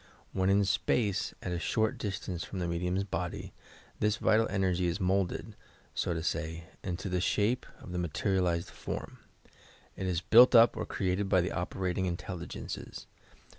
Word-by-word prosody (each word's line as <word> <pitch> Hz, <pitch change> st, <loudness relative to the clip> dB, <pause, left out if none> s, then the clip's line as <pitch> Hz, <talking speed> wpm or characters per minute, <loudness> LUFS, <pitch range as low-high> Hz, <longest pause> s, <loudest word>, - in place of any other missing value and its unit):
When 95 Hz, 0 st, +1 dB
in 100 Hz, +1 st, +4 dB
space, 100 Hz, 0 st, +1 dB
at 90 Hz, -, -3 dB
a 85 Hz, -, -1 dB
short 110 Hz, +5 st, 0 dB
distance 95 Hz, -4 st, -3 dB
from 95 Hz, -, -7 dB
the 90 Hz, -1 st, -1 dB
medium's 90 Hz, +3 st, 0 dB
body, 100 Hz, -, -4 dB, 0.5 s
this 105 Hz, +1 st, +2 dB
vital 110 Hz, 0 st, +3 dB
energy 95 Hz, -2 st, +1 dB
is 85 Hz, +4 st, -1 dB
moulded, 95 Hz, +3 st, 0 dB, 0.4 s
so 85 Hz, -, -1 dB
to 80 Hz, -, -3 dB
say, 80 Hz, 0 st, -2 dB, 0.2 s
into 90 Hz, +1 st, -3 dB
the 90 Hz, -1 st, 0 dB
shape 105 Hz, +6 st, +1 dB
of 95 Hz, -, -10 dB
the 90 Hz, -, -2 dB
materialized 90 Hz, 0 st, 0 dB
form. -, -, -6 dB, 0.8 s
It 95 Hz, -, -3 dB
is 90 Hz, -3 st, +1 dB
built 120 Hz, +7 st, +7 dB
up 115 Hz, +1 st, +7 dB
or -, -, -3 dB
created 95 Hz, +1 st, -1 dB
by 95 Hz, -, +5 dB
the 90 Hz, -, -2 dB
operating 95 Hz, 0 st, -1 dB
intelligenees. 90 Hz, 0 st, -6 dB
95 Hz, 160 wpm, -31 LUFS, 90-100 Hz, 0.8 s, built